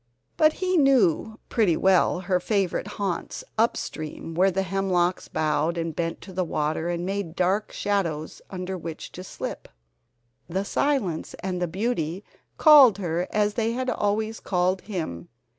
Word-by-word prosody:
But 310 Hz, 0 st, +4 dB
he 370 Hz, -1 st, 0 dB
knew 225 Hz, -, +3 dB
pretty 200 Hz, -8 st, +2 dB
well 185 Hz, -1 st, +3 dB
her 180 Hz, 0 st, +1 dB
favorite 195 Hz, -1 st, 0 dB
haunts 195 Hz, -4 st, -3 dB
up 225 Hz, +1 st, +2 dB
stream 155 Hz, +1 st, -6 dB
where 185 Hz, +4 st, +4 dB
the 195 Hz, +1 st, 0 dB
hemlocks 185 Hz, -1 st, 0 dB
bowed 155 Hz, +2 st, 0 dB
and 165 Hz, -2 st, -3 dB
bent 165 Hz, -1 st, -3 dB
to 190 Hz, -, -11 dB
the 185 Hz, +1 st, 0 dB
water, 160 Hz, 0 st, -1 dB
and 175 Hz, 0 st, -2 dB
made 195 Hz, -3 st, -3 dB
dark 190 Hz, +4 st, +1 dB
shadows 170 Hz, -7 st, -2 dB
under 185 Hz, 0 st, -4 dB
which 165 Hz, -1 st, -7 dB
to 185 Hz, -, -8 dB
slip. -, -, -6 dB, 0.8 s
The 190 Hz, +3 st, -1 dB
silence 205 Hz, -, -1 dB
and 185 Hz, -1 st, -2 dB
the 175 Hz, -, +1 dB
beauty 185 Hz, -2 st, -2 dB, 0.3 s
called 280 Hz, -, +8 dB
her 175 Hz, -2 st, -2 dB
as 210 Hz, 0 st, +1 dB
they 230 Hz, 0 st, 0 dB
had 255 Hz, +1 st, -1 dB
always 215 Hz, +1 st, -1 dB
called 185 Hz, 0 st, 0 dB
him. 160 Hz, -, -5 dB
185 Hz, 155 wpm, -25 LUFS, 170-210 Hz, 0.8 s, called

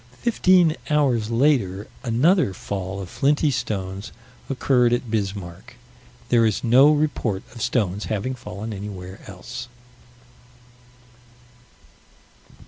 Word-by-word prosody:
Fifteen 185 Hz, -8 st, +4 dB
hours 130 Hz, -8 st, +2 dB
later 115 Hz, -6 st, +1 dB, 0.2 s
another 130 Hz, -, +2 dB
fall 95 Hz, 0 st, -5 dB
of 95 Hz, -, -6 dB
flinty 140 Hz, -, +1 dB
stones 100 Hz, -5 st, -4 dB, 0.4 s
occurred 125 Hz, -2 st, +2 dB
at 120 Hz, -2 st, -2 dB
Bismarck. 100 Hz, -5 st, -4 dB, 0.5 s
There 120 Hz, -1 st, +4 dB
is 110 Hz, -3 st, +1 dB
no 130 Hz, +5 st, +6 dB
report 145 Hz, -10 st, 0 dB
of 115 Hz, -, -9 dB
stones 105 Hz, -5 st, 0 dB
having 110 Hz, +4 st, -2 dB
fallen 110 Hz, -3 st, -7 dB
anywhere 95 Hz, -1 st, -7 dB
else. 100 Hz, +5 st, -8 dB
115 Hz, 100 wpm, -23 LUFS, 100-135 Hz, 0.5 s, no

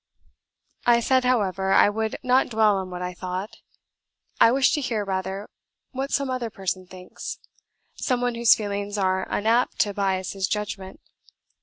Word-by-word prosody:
I 235 Hz, -1 st, +6 dB
said, 255 Hz, +2 st, +2 dB
however, 195 Hz, -6 st, +1 dB
I -, -, +6 dB
would 220 Hz, +1 st, -1 dB
not 255 Hz, +1 st, +3 dB
dwell 215 Hz, -3 st, +3 dB
on 190 Hz, -1 st, -4 dB
what 180 Hz, 0 st, -5 dB
I 180 Hz, 0 st, -4 dB
thought; 185 Hz, +3 st, -5 dB, 0.8 s
I 230 Hz, -, +7 dB
wish 265 Hz, +1 st, +3 dB
to 295 Hz, -, 0 dB
hear, 225 Hz, -6 st, -2 dB
rather, 190 Hz, +1 st, -3 dB, 0.4 s
what 270 Hz, +1 st, -3 dB
some 280 Hz, -1 st, +1 dB
other 250 Hz, -3 st, -2 dB
person 185 Hz, -2 st, -4 dB
thinks, 180 Hz, 0 st, -8 dB, 0.6 s
some 250 Hz, -2 st, -1 dB
one 245 Hz, 0 st, 0 dB
whose 235 Hz, 0 st, +5 dB
feelings 205 Hz, -1 st, -4 dB
are 190 Hz, -1 st, 0 dB
unapt 230 Hz, +4 st, +1 dB
to 205 Hz, -, 0 dB
bias 190 Hz, -2 st, -1 dB
his 195 Hz, -1 st, -2 dB
judgment. 195 Hz, -2 st, -4 dB
205 Hz, 160 wpm, -24 LUFS, 190-235 Hz, 0.8 s, I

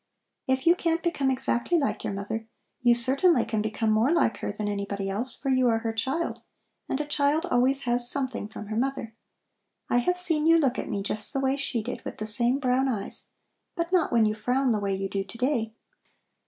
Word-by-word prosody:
If 260 Hz, 0 st, 0 dB
you 340 Hz, -, +7 dB
can't 335 Hz, -1 st, -1 dB
become 300 Hz, -6 st, 0 dB
exactly 265 Hz, +4 st, 0 dB
like 245 Hz, -9 st, -1 dB
your -, -, -2 dB
mother, 220 Hz, +3 st, -5 dB, 0.3 s
you 240 Hz, -1 st, +5 dB
certainly 265 Hz, +3 st, +4 dB
can 220 Hz, -1 st, -1 dB
become 215 Hz, +1 st, -1 dB
more 220 Hz, +4 st, +3 dB
like 335 Hz, -9 st, +2 dB
her -, -, -4 dB
than 210 Hz, 0 st, -4 dB
anybody 200 Hz, -1 st, -3 dB
else, 235 Hz, +6 st, -1 dB
for 275 Hz, -, -3 dB
you 255 Hz, -1 st, +3 dB
are 225 Hz, -1 st, +3 dB
her 225 Hz, 0 st, -3 dB
child, 265 Hz, +9 st, -2 dB, 0.5 s
and 270 Hz, -, -1 dB
a 300 Hz, -, -2 dB
child 295 Hz, +3 st, +1 dB
always 265 Hz, -2 st, +3 dB
has 240 Hz, 0 st, 0 dB
something 260 Hz, -6 st, -3 dB
from 210 Hz, -1 st, -9 dB
her 215 Hz, -, -3 dB
mother. 250 Hz, -2 st, -2 dB, 0.8 s
I -, -, +4 dB
have 360 Hz, +9 st, 0 dB
seen 325 Hz, -4 st, +3 dB
you 330 Hz, 0 st, +6 dB
look 270 Hz, -5 st, +1 dB
at -, -, -5 dB
me 200 Hz, -, -2 dB
just 210 Hz, +1 st, -1 dB
the 270 Hz, -, 0 dB
way 270 Hz, 0 st, +1 dB
she 250 Hz, -5 st, -2 dB
did, 245 Hz, -, -6 dB
with -, -, -7 dB
the 215 Hz, -, -4 dB
same 235 Hz, +4 st, +1 dB
brown 265 Hz, -1 st, +1 dB
eyes; 210 Hz, -6 st, 0 dB, 0.5 s
but 340 Hz, -1 st, -3 dB
not 360 Hz, -3 st, +2 dB
when 230 Hz, -2 st, +4 dB
you 215 Hz, -, +1 dB
frown 250 Hz, +4 st, 0 dB
the 215 Hz, -, +1 dB
way 200 Hz, -1 st, -1 dB
you 195 Hz, 0 st, -3 dB
do 195 Hz, 0 st, -2 dB
to 230 Hz, -, -12 dB
day. 235 Hz, -3 st, -1 dB
245 Hz, 220 wpm, -26 LUFS, 220-275 Hz, 0.8 s, you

